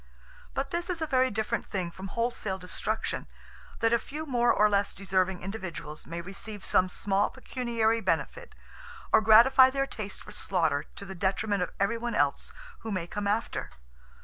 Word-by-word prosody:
But - - -2
this 345 +1 -2
is 355 -2 -1
a 320 - 0
very 260 -3 +3
different 220 -1 -2
thing 180 -3 -3
from 190 +3 -8
wholesale 230 -3 -2
destruction, 190 +4 -2 0.5
that 230 0 +3
a 235 - +4
few 305 +7 -6
more 240 -4 +3
or 210 - +5
less 200 -1 +1
deserving 190 -1 0
individuals 185 -6 -6
may 170 +1 -4
receive 195 +3 -6
some 185 0 +3
small 195 +2 +1
pecuniary 235 -4 -1
benefit, 485 - -2 0.6
or - - +7
gratify 240 +5 +8
their 275 +1 0
taste 215 -7 -6
for - - -11
slaughter 160 -6 0
to 200 - -7
the 190 - -7
detriment 195 +2 0
of 180 - -1
everyone 230 +4 0
else - - +1 0.3
who 225 - -6
may 185 -4 -2
come 205 +3 -4
after. 215 +3 -1
210 Hz, 170 wpm, -29 LUFS, 190-235 Hz, 0.6 s, gratify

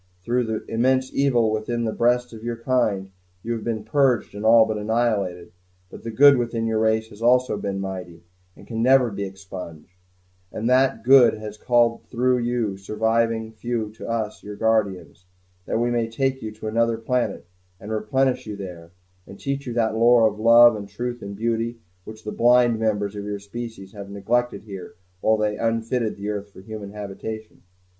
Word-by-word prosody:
Through 120 +3 0
the 110 -1 -4
immense 130 +3 +1
evil 120 -5 +2
within 115 +2 -2
the 110 - -1
breasts 125 0 +1
of 110 0 -10
your 120 0 -3
kind, 110 -6 0 0.3
you 120 - -2
have 115 -2 -5
been 110 -2 -3
purged 125 0 +1
and 105 +1 -7
all 115 0 +7
but 110 -1 -3
annihilated; 105 -5 -1 0.4
but - - -10
the 115 - -5
good 140 +5 +6
within 115 -1 -1
your 110 -1 0
race 110 0 +1
has 105 0 -14
also 125 +1 +3
been 100 -1 -3
mighty, 90 -3 -6 0.3
and - - -14
can 115 -1 -4
never 130 -1 +4
be 100 0 -4
expunged; 95 -4 -9 0.6
and 115 - -3
that 130 -2 +3
good 130 -1 +7
has 105 -1 -8
called 120 +1 +2
through 125 +1 +1
you 120 -4 -1
surviving 110 +2 0
few 110 -1 -3
to 110 - -9
us 110 -2 -3
your 105 0 -8
guardians, 100 -5 -1 0.4
that - - 0
we 120 +1 +1
may 115 -1 0
take 135 +3 -1
you 110 - -5
to 110 - -11
another 115 +1 +1
planet, 125 -2 -2 0.3
and 105 +2 -8
replenish 125 +4 0
you 105 - -5
there, 90 -4 -9 0.4
and 95 - -12
teach 140 0 -3
you 120 - -3
that 115 -2 +1
lore 115 0 +5
of 105 0 -4
love 120 +1 +7
and 100 -1 -7
truth 120 +4 -5
and 100 0 -7
beauty 115 +2 -1 0.3
which 110 0 -11
the 105 - -5
blind 120 -1 +4
members 105 -2 -1
of 100 - -5
your 105 0 -4
species 100 -1 -8
have 100 -2 -9
neglected 115 +5 -1
here 95 -4 -9 0.2
while 110 +3 +2
they 105 -1 -1
unfitted 115 0 -1
the 100 +1 -6
earth 105 -1 -4
for 95 - -14
human 105 0 -8
habitation." 105 +2 -7
110 Hz, 185 wpm, -23 LUFS, 105-120 Hz, 0.6 s, all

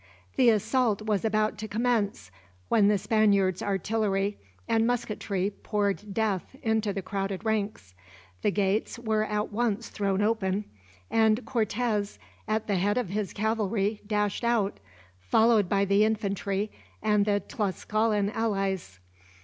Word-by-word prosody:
The 250 - +5
assault 220 0 +2
was 215 -1 0
about 215 -1 +1
to 215 - -4
commence, 215 - -1 0.4
when 210 -3 +4
the 210 0 +4
Spaniards' 200 -3 +2
artillery 200 0 0 0.3
and 225 0 +2
musketry 210 -5 -1
poured 205 -1 -1
death 210 +1 -1
into 220 -2 +1
the 195 -1 -4
crowded 195 +2 -3
ranks. 210 - -2 0.5
The - - +2
gates 200 +3 0
were 220 -2 0
at 210 0 -2
once 225 0 -1
thrown 200 -1 0
open, 210 -2 0 0.5
and 220 +1 +3
Cortez 215 -2 -1 0.3
at 215 0 0
the 200 -2 0
head 205 +5 +1
of 245 -7 -1
his 205 0 -2
cavalry 215 -1 -1
dashed 210 0 0
out, 230 - +1 0.4
followed 210 - +3
by 200 0 +2
the 200 +2 +4
infantry 205 -1 -1 0.3
and 210 -1 +3
the 205 -1 +2
Tlascalan 210 0 -1
allies. 195 - -2
210 Hz, 135 wpm, -28 LUFS, 200-220 Hz, 0.5 s, The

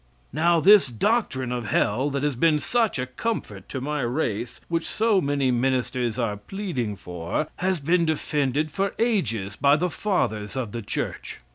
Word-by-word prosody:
Now 170 +3 +3
this 200 +2 +7
doctrine 130 - 0
of 120 -3 -3
hell, 125 +9 +1
that 140 0 -2
has 145 -3 0
been 155 +4 +3
such 230 +4 +1
a 125 - -1
comfort 130 - -4
to 130 - -4
my 150 +2 -2
race, 120 -3 -2
which 165 -1 -1
so 220 -3 +2
many 140 -2 +1
ministers 125 -2 0
are 115 -4 -1
pleading 130 - -4
for, 90 - -3
has 185 -1 0
been 170 +4 +2
defended 150 -1 0
for 195 +3 -1
ages 115 - 0
by 140 +1 +4
the 175 +3 0
fathers 110 - -1
of 125 -5 -3
the 120 - -4
church. 100 - -4
140 Hz, 165 wpm, -25 LUFS, 120-170 Hz, -, this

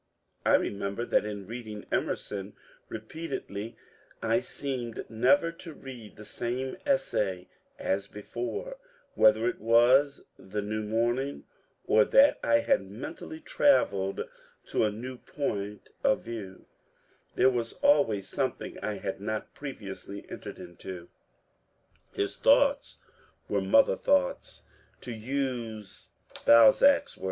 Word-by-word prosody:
I - - +6
remember 100 +3 -1
that - - +2
in 100 -2 -5
reading 110 -1 -7
Emerson 100 0 -2 0.4
^repeatedly 110 -3 -6 0.4
I - - +2
seemed 125 -5 -5
never 130 - +3
to 165 -1 -11
read 125 -6 -10
the 105 - -11
same 125 +4 -3
essay 95 - 0 0.3
as 100 +1 -1
before: 120 - -5 0.4
whether 110 +1 +5
it 120 - -2
was 125 +6 +4 0.2
the 100 +2 -4
new 110 +1 -2
morning, 120 +6 -1 0.4
or 110 0 +5
that 275 - +5
I 290 0 +4
had - - +2
mentally 315 0 -8
travelled 100 - +2 0.5
to - - +2
a 105 - +1
new 125 +5 -7
point 105 -7 -4
of 135 - +3
view, 105 -5 -8 0.7
there 130 - +5
was 115 -2 -2
always 115 -10 +3
something - - -3
I 105 - -2
had 95 0 -5
not 110 +1 -4
previously 100 -7 -8
entered - - -7
into« 85 0 -9 1.0
His 100 - -2
thoughts 280 0 +3 0.5
were - - 0
mother - - +4
thoughts, 280 - 0 0.4
to 125 - -7
use 115 -3 -4 0.3
Balzac's 135 - +6
won). - - -20
115 Hz, 120 wpm, -29 LUFS, 105-140 Hz, 1.0 s, I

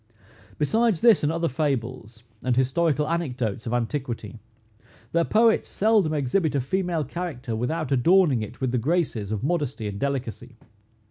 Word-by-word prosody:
Besides 220 +5 +1
this, 230 -5 +6
and 150 - +1
other 165 +1 0
fables, 125 -5 -3 0.2
and 125 -2 +1
historical 150 +3 +1
anecdotes 125 -10 -2
of 115 - -2
antiquity, 120 -1 -3 0.7
their 170 0 +2
poets 225 +1 +3
seldom 210 -6 +2
exhibit 150 +3 0
a - - +2
female 175 +3 -1
character 140 -6 -5
without 145 +6 -2
adorning 145 - +4
it 105 - -7
with 130 -2 -1
the 125 - +1
graces 130 - -1
of 110 +1 -3
modesty 140 -8 -1
and 100 -1 -5
delicacy. 125 -3 -4
140 Hz, 145 wpm, -25 LUFS, 120-170 Hz, 0.7 s, this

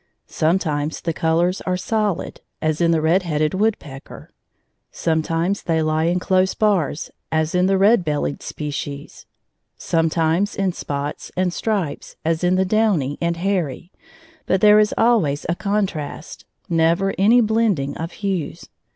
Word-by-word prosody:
Sometimes 155 -3 -1
the 165 - -2
colors 170 +4 +1
are 185 -1 -1
"solid," 210 -1 -2 0.2
as 155 +1 -1
in 170 - +3
the 165 -2 +2
red 165 +5 +3
headed 155 -2 -1
woodpecker; 190 -10 -3 0.6
sometimes 165 +4 -1
they 160 -2 0
lie 155 +1 +1
in 175 +2 +1
close 185 +1 +1
bars, 190 -9 0 0.2
as 160 0 0
in 180 +1 +3
the 195 0 +2
red 205 +1 +4
bellied 150 -2 -2
species; 145 -1 -6 0.5
sometimes 165 +4 0
in 195 -1 0
spots 145 -3 -5
and 180 -1 +1
stripes, 190 -11 -3
as 165 +1 0
in 180 +1 +3
the 190 0 +2
downy 190 -9 +1
and 170 0 0
hairy; 175 -3 -2 0.6
but 190 - +2
there 210 +1 +6
is 210 0 +3
always 210 -12 +2
a 170 - +1
contrast, 195 -7 -3 0.2
never 170 +3 +2
any 220 +5 +5
blending 215 - +1
of 165 +2 -5
hues. 190 -6 -4
170 Hz, 140 wpm, -21 LUFS, 155-195 Hz, 0.6 s, there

